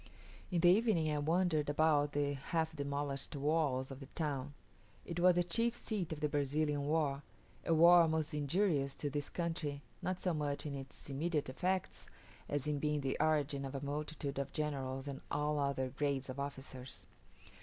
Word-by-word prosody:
In 175 -3 +1
the 175 - +7
evening 180 -6 +3
I 150 - 0
wandered 160 -1 +2
about 145 -1 +3
the 145 0 +1
half 160 +3 -2
demolished 140 0 -3
walls 140 -3 +1
of 135 - -7
the 135 - -9
town. 145 -3 -2 0.5
It 170 0 -4
was 180 0 +6
the 175 - +3
chief 230 +7 +1
seat 210 -8 -3
of 155 -2 -4
the 150 - +2
Brazilian 145 0 0
war; 145 -3 +1 0.4
a 165 - +3
war 170 +1 +8
most 160 0 0
injurious 150 -2 +1
to 145 - -3
this 145 +1 -2
country, 160 -4 -3 0.2
not 185 0 -2
so 180 - 0
much 145 -2 -2
in 145 - -3
its 135 -1 -8
immediate 150 0 -1
effects, 185 +7 -2 0.4
as 145 -1 -1
in 150 -1 0
being 150 0 0
the 135 -1 -1
origin 150 -3 +2
of 135 0 -5
a 135 +1 -4
multitude 145 -1 -3
of 140 0 -3
generals 135 -3 -2
and 140 -1 -5
all 150 +1 0
other 140 -2 0
grades 135 0 -1
of 130 - -7
officers. 135 -2 -7
145 Hz, 175 wpm, -35 LUFS, 140-160 Hz, 0.5 s, war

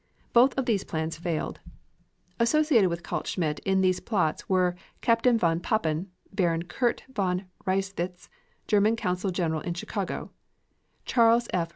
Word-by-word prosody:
Both 250 +3 +5
of 265 - 0
these 210 -5 +1
plans 160 0 -3
failed. 170 -2 -3 0.8
Associated 235 - +4
with 170 0 -4
Kaltschmidt 155 -5 -2
in 190 0 +1
these 185 -1 +2
plots 180 -8 -1
were 180 -2 +2 0.3
Captain 230 0 +3
von 165 -5 +2
Papen, 175 -3 -1 0.2
Baron 170 -4 +1
Kurt 235 +7 -1
von 185 -3 -1 0.2
Reiswitz, 185 -2 -2 0.4
German 210 +2 +3
consul 180 -3 -1
general 165 -4 -1
in 175 - -4
Chicago; 175 - -4 0.7
Charles 235 -1 +4
F. 170 -2 0
185 Hz, 135 wpm, -27 LUFS, 170-225 Hz, 0.8 s, Both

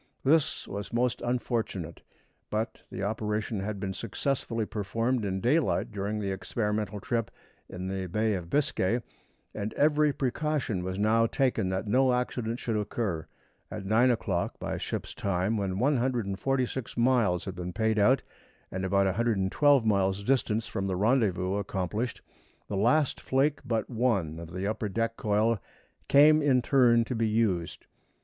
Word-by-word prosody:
This 150 +2 +2
was 100 +1 -6
most 120 +1 0
unfortunate; 115 -8 -2 0.5
but 110 +2 -2
the 95 - -5
operation 105 0 -2
had 100 +1 -4
been 95 0 -3
successfully 115 +1 -2
performed 115 +4 -1
in 95 -1 -1
daylight 145 - +1
during 105 +1 -3
the 100 -2 -2
experimental 105 +1 -2
trip 115 +3 -1 0.4
in 90 0 -5
the 95 -1 -3
Bay 110 +4 0
of 90 -3 -4
Biscay, 120 - +1 0.5
and 105 0 -4
every 150 0 +3
precaution 135 -7 -1
was 95 +1 -3
now 110 +2 +3
taken 125 -7 0
that 95 +2 -2
no 125 +4 +3
accident 125 -2 -1
should 115 -3 -2
occur. 105 -5 -2 0.4
At - - -6
nine 115 +5 +4
o'clock 100 -7 -1
by - - -3
ship's - - -4
time, 100 +2 0
when 95 -3 -1
146 125 0 0
miles 115 -8 +2
had 95 - -4
been 90 0 -5
paid 110 +3 +1
out 125 +7 +4 0.5
and 95 0 -3
about 100 +1 +2
112 115 +6 +2
miles' 100 -2 +1
distance 115 -3 +1
from 95 0 -3
the 95 - -1
rendezvous 100 -3 +1
accomplished, 100 +4 -3 0.4
the 100 - -4
last 125 +9 +2
flake 140 +3 +1
but 115 -3 -1
one 110 - 0
of 85 -1 -9
the 95 +1 -4
upper 105 0 -2
deck 115 +3 -1
coil 110 +1 +1 0.5
came 155 +2 +6
in 130 -4 +3
turn 120 -4 +4
to 125 - -3
be 115 -1 +1
used. 105 -6 0
110 Hz, 150 wpm, -28 LUFS, 95-125 Hz, 0.5 s, came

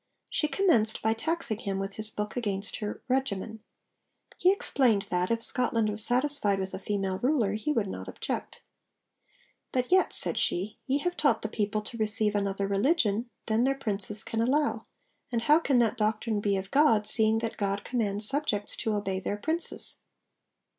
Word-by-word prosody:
She 300 - 0
commenced 300 - +1
by 220 0 +3
taxing 265 -3 -2
him 195 -4 -3
with 195 0 -4
his 215 +1 0
book 210 0 -4
against 205 -5 -3
her 210 -1 -5
'regimen.' 225 -5 -2 0.8
He 365 - +5
explained 250 - +2
that, 180 0 0
if 230 0 0
Scotland 230 -3 +1
was 210 +1 +1
satisfied 250 -5 +2
with 190 0 -4
a - - -4
female 195 -2 -2
ruler, 245 -7 +1
he 220 +8 -2
would 225 -8 0
not - - -7
object. - - -5 1.1
'But 250 +3 -1
yet,' 375 0 +4
said - - +2
she, 195 +5 -1
'ye 270 +1 +2
have 355 0 -1
taught 265 -7 +1
the 220 - -2
people 210 0 -2
to 230 +2 -7
receive 215 -1 +3
another 200 -1 -1
religion 225 - +1 0.2
than 220 +1 +1
their 270 +1 +2
Princes 210 -3 0
can 225 - -2
allow: 285 +5 0 0.4
And 230 -1 -1
how 300 +5 +5
can 280 -6 +1
that 230 -3 +2
doctrine 215 0 0
be 200 -1 +1
of 190 +1 -6
God, 250 -8 +4
seeing 220 0 +3
that 225 0 -3
God 200 0 -2
commands 210 -4 0
subjects 245 -8 +1
to 220 -1 -1
obey 195 -2 -2
their 205 +2 -3
Princes?' 320 +10 0
220 Hz, 175 wpm, -28 LUFS, 205-255 Hz, 1.1 s, He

